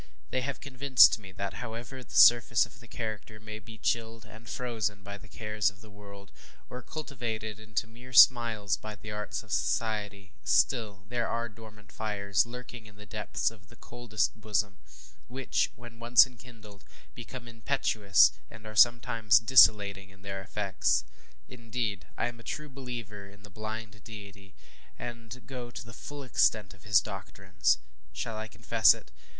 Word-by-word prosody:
They 130 - 0
have 140 +1 -4
convinced 135 -3 +5
me 95 -3 -12
that, 100 +3 -5
however 120 +2 -7
the - - -12
surface 120 -1 +7
of 115 - -16
the 120 - -15
character 110 -2 -6
may 110 0 -8
be 110 0 -12
chilled 115 +1 -2
and 110 +1 -13
frozen 110 -5 -3
by 100 +1 -8
the 110 - -14
cares 105 -1 -1
of 100 -1 -17
the 110 -1 -15
world, 100 -1 -13 0.4
or 125 - -6
cultivated 115 -8 -5
into 110 +1 -3
mere 120 +3 -14
smiles 115 -5 +6
by 105 0 -8
the 105 +2 -9
arts 105 -1 -4
of - - -14
society, 100 - -2
still 100 - +1
there 120 -1 -1
are 115 0 -2
dormant 110 -2 -15
fires 100 -1 0
lurking 125 -2 -9
in 105 - -16
the 105 +1 -13
depths 105 0 -2
of 100 -3 -18
the - - -16
coldest 120 -3 -2
bosom, 105 -2 -1 0.5
which, 130 +1 -1
when 120 -1 -13
once 120 +2 +7
enkindled, 115 -6 -15 0.3
become 120 +1 -9
impetuous, 110 - +3 0.2
and 110 0 -13
are 110 0 -8
sometimes 115 -3 +5
desolating 105 -4 +5
in 95 0 -19
their 100 -1 -5
effects. 95 -9 0 0.4
Indeed, 115 -3 -4
I - - 0
am 120 -1 -5
a - - -13
true 150 +3 -5
believer 120 -7 -7
in 100 +1 -18
the 105 - -13
blind 110 0 -7
deity, 100 -3 -12 0.4
and 120 +1 -8
go 125 -3 -7
to 120 - -9
the 115 - -12
full 145 +5 -8
extent 110 -5 +2
of 95 0 -19
his 105 -3 +5
doctrines. 95 -2 -1 0.3
Shall 115 - -4
I 110 0 -5
confess - - +4
it? - - -15
110 Hz, 165 wpm, -29 LUFS, 100-120 Hz, 0.5 s, surface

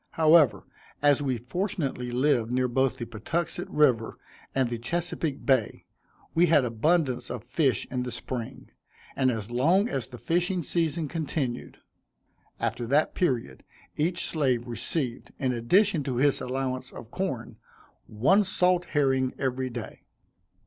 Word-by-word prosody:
However, 160 -4 +5 0.4
as 145 -1 +4
we 130 -3 0
fortunately 135 - -3
lived 125 -2 +1
near 125 +1 +1
both 130 +1 +1
the 120 - -4
Patuxent 135 +10 -3
river 130 -7 +2 0.4
and 135 -2 +2
the 120 -1 -4
Chesapeake 160 +2 -3
Bay, 130 -6 +1 0.5
we 175 +2 +4
had 150 -5 +4
abundance 125 +1 +1
of 120 -3 -5
fish 135 +2 +1
in 125 -1 -1
the 125 0 -4
spring, 120 -2 -6 0.4
and 130 -1 +2
as 110 -2 -3
long 170 - +3
as 130 - -3
the 125 - -10
fishing 175 - 0
season 165 -1 0
continued. 140 -5 -3 0.8
After 120 - -2
that 145 +5 +2
period, 120 - -1 0.3
each 170 +4 +1
slave 130 -6 0
received, 120 +2 -3
in 130 -2 0
addition 170 - +3
to 130 - -2
his 140 +3 +2
allowance 130 0 -3
of 115 - -11
corn, 135 -12 -4 0.5
one 145 - +3
salt 180 -2 +2
herring 135 -3 +1
every 130 -1 -1
day. 120 -3 -7
130 Hz, 140 wpm, -27 LUFS, 120-160 Hz, 0.8 s, However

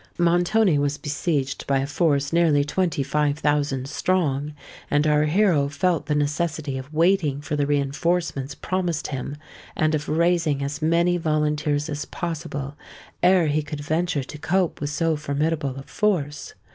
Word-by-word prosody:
Montoni 175 +1 +3
was 145 +1 0
besieged 145 -2 -2
by 140 - +2
a 135 - 0
force 145 -1 +1
nearly 160 -4 +4
twenty 155 0 0
five 145 +1 0
thousand 145 -3 0
strong; 150 -3 0 0.3
and 145 +1 +2
our 150 0 +3
hero 155 -4 +3
felt 165 +3 0
the 150 - +1
necessity 150 -1 -1
of 130 +3 -10
waiting 165 -3 +2
for 150 0 -4
the 145 -1 0
reinforcements 145 0 -1
promised 180 -4 -2
him, 140 +1 -5 0.4
and 155 0 +1
of 150 -1 -2
raising 165 -3 +2
as 140 +2 -4
many 170 +3 +2
volunteers 150 -2 0
as 145 -2 -4
possible, 150 -5 -5 0.5
ere 180 -1 +5
he 150 0 +1
could 150 0 -6
venture 155 0 -1
to 150 +3 -10
cope 180 +2 0
with 145 - -1
so 160 +2 0
formidable 150 -1 -1
a 135 - -7
force. 150 -7 -1
150 Hz, 155 wpm, -24 LUFS, 145-170 Hz, 0.5 s, ere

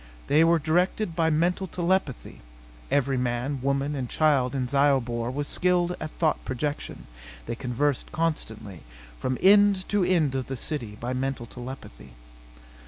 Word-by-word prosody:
They 155 +3 +4
were 165 +1 +4
directed 170 +4 0
by 165 -1 +2
mental 175 +4 +1
telepathy 175 -5 -2 0.5
(Every 135 -1 +1
man, 125 +3 -1
woman 140 +2 0
and 130 -4 -4
child 140 -5 +2
in 130 -2 -1
Zyobor 125 -4 +1
was 145 +3 -3
skilled 180 -1 +1
at 155 - -4
thought 160 -2 +1
projection. 130 - -4 0.4
They 115 - -3
conversed 125 +3 -1
constantly, 110 - -3 0.4
from 130 0 -1
end 200 -1 +5
to 205 -2 +2
end 170 -7 +2
of 130 -1 -2
the 135 - -4
city, 120 -6 -5
by 125 +2 -3
mental 130 -1 -2
telepathy.) 115 - -10
140 Hz, 145 wpm, -26 LUFS, 125-165 Hz, 0.5 s, end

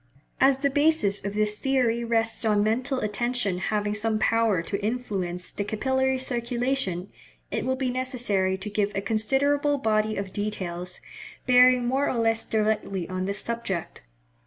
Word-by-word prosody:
As 270 0 +5
the 280 +1 0
basis 290 -9 +2
of 200 +1 -4
this 210 0 0
theory 250 -3 +1
rests 225 -1 0
on 210 -2 +3
mental 245 +5 0
attention 215 -2 -1
having 210 +1 -1
some 215 +1 0
power 220 -5 +2
to 200 +3 -4
influence 195 -6 -2
the 205 - -3
capillary 265 +5 0
circulation, 240 -6 -1 0.4
it - - -2
will 260 0 +1
be 260 -1 -1
necessary 240 -7 0
to 195 +3 -5
give 205 0 0
a 195 - 0
considerable 280 +8 +1
body 215 -3 +1
of 195 -1 -5
details, 180 -4 -4 0.4
bearing 250 0 +6
more 270 +4 +1
or 250 - -1
less 225 0 +1
directly 210 -4 -1
on 185 0 -2
this 200 +2 -2
subject. 230 -7 -4
225 Hz, 155 wpm, -26 LUFS, 200-255 Hz, 0.4 s, bearing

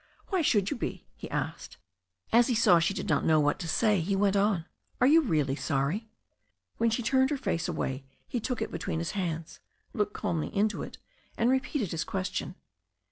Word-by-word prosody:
"Why 380 -3 +1
should 205 - +2
you - - -2
be?'* - - -4
he - - -8
asked. - - -4 0.6
As 235 +1 +6
he 250 - +1
saw 180 -6 +6
she 175 +4 0
did - - -4
not 150 -3 +2
know 160 -1 +4
what 145 0 +1
to 175 - -4
say 210 +4 +2
he 195 +4 0
went 200 0 +2
on, 200 -4 +2 0.3
"Are 250 - +4
you 315 +5 +6
really 150 - +1
sorry?" 150 +10 -1 0.7
When 230 - +3
she 225 +2 -1
turned 260 +2 +3
her 295 - -1
face 170 -10 -1
away 135 +1 -3 0.2
he 245 - -2
took 245 +2 -2
it - - -6
between - - -3
his 165 0 -2
hands, 170 -5 -4 0.3
looked 210 -1 -1
calmly 160 -2 -2
into 215 +1 +1
it, - - -7 0.4
and 235 +2 +3
repeated 260 - 0
his 165 - -1
question. 185 -1 -3
200 Hz, 195 wpm, -29 LUFS, 165-235 Hz, 0.7 s, As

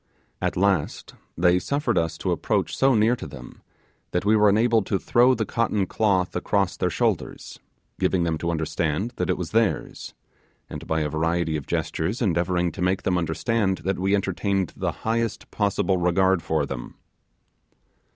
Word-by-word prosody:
At - - -1
last 95 -4 0 0.2
they 90 +1 +4
suffered 140 0 -1
us 80 -2 0
to - - -2
approach - - -1
so 135 -1 +3
near 110 +3 +3
to - - -8
them - - -12 0.5
that 90 - 0
we 105 +2 +4
were 105 -1 +5
enabled 110 +1 +2
to 100 - +1
throw 125 +6 +3
the 110 -2 -1
cotton 110 -4 0
cloth 95 -3 0
across 100 -3 0
their 90 - 0
shoulders, - - -2 0.4
giving 90 -2 +1
them 80 -2 -1
to 85 - -2
understand 80 +5 -1
that - - -1
it - - +1
was 90 -3 -5
theirs, 115 -1 -1 0.5
and - - -8
by 80 0 0
a 75 - -1
variety 80 +1 0
of 75 -3 -5
gestures 95 +9 -2
endeavouring 90 -3 +1
to 95 - -8
make 90 +2 +1
them 90 - +1
understand 95 +4 0
that 95 -1 -1
we 95 +2 +2
entertained 95 -1 -1
the - - -2
highest 115 0 -1
possible 100 -2 +1
regard 90 +1 +2
for 80 -3 0
them. - - -7
95 Hz, 170 wpm, -24 LUFS, 85-110 Hz, 0.5 s, were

